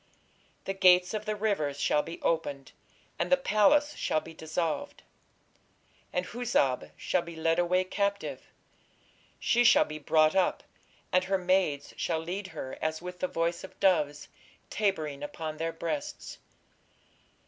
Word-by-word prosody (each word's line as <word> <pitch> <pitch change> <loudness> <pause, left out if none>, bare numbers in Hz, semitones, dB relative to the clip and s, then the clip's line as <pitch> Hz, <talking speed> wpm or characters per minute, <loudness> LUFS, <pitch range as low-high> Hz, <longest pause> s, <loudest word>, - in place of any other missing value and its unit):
The 195 - -2
gates 180 -1 +5
of 215 0 -3
the 215 -1 -1
rivers 195 -10 -1
shall 150 - +2
be 165 +3 -8
opened, 140 -4 -1 0.5
and - - -1
the 275 - +7
palace 280 +5 +3
shall 155 - 0
be 165 +1 -11
dissolved. 160 -1 -3 1.1
And 180 0 -1
Huzzab 225 - 0
shall 180 - 0
be 170 -1 -9
led 165 +1 +1
away 180 +1 +2
captive, 200 +2 -2 0.9
she 240 +1 +3
shall - - +6
be 155 0 -7
brought 155 +2 +3
up, 190 -2 +2 0.5
and 185 0 +3
her 195 +1 +1
maids 180 -6 0
shall 165 - 0
lead 180 +5 -4
her 155 -6 -7
as 155 0 -1
with 180 +1 -8
the 185 - 0
voice 170 0 -1
of 190 - -11
doves, 150 -6 +2 0.4
tabering 155 -9 -1
upon 155 +1 -5
their 165 +1 -2
breasts.... 285 - -5
175 Hz, 145 wpm, -29 LUFS, 155-195 Hz, 1.1 s, the